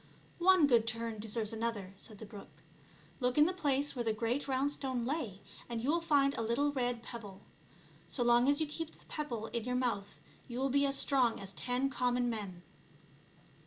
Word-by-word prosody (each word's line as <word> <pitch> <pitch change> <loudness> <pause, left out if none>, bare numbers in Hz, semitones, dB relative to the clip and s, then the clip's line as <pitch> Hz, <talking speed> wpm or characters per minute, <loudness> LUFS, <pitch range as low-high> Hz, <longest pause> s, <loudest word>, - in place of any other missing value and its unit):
" - - -29
One 370 -5 +7
good 235 -5 +4
turn 230 -1 -2
deserves 215 0 -2
another," 220 -4 -3
said 210 +2 -11
the 220 - -8
brook. 195 -8 -13 0.2
" 150 -2 -26
Look 250 +1 +1
in 300 - +7
the 360 - +1
place 285 -5 0
where 240 - -1
the 225 -1 +1
great 235 +6 -1
round 270 +1 +1
stone 260 -4 -2
lay 240 - -3 0.3
and 235 -1 -2
you 255 +6 +1
will 340 +1 +1
find 280 -4 +3
a - - -3
little 240 +6 +1
red 245 -3 -1
pebble; 210 -6 -8 0.7
so 245 - +2
long 240 +2 +5
as 285 - +3
you 315 - +1
keep 315 +2 -6
that - - -21
pebble 245 -8 -3
in 235 -2 -1
your 250 0 -1
mouth 230 -6 -1 0.3
you 240 -1 -6
will 265 +1 0
be 280 +1 +3
as 275 0 0
strong 255 -5 +2
as 195 0 -7
ten 250 +2 0
common 245 -1 +1
men." 195 -6 -5
245 Hz, 205 wpm, -33 LUFS, 220-275 Hz, 0.7 s, One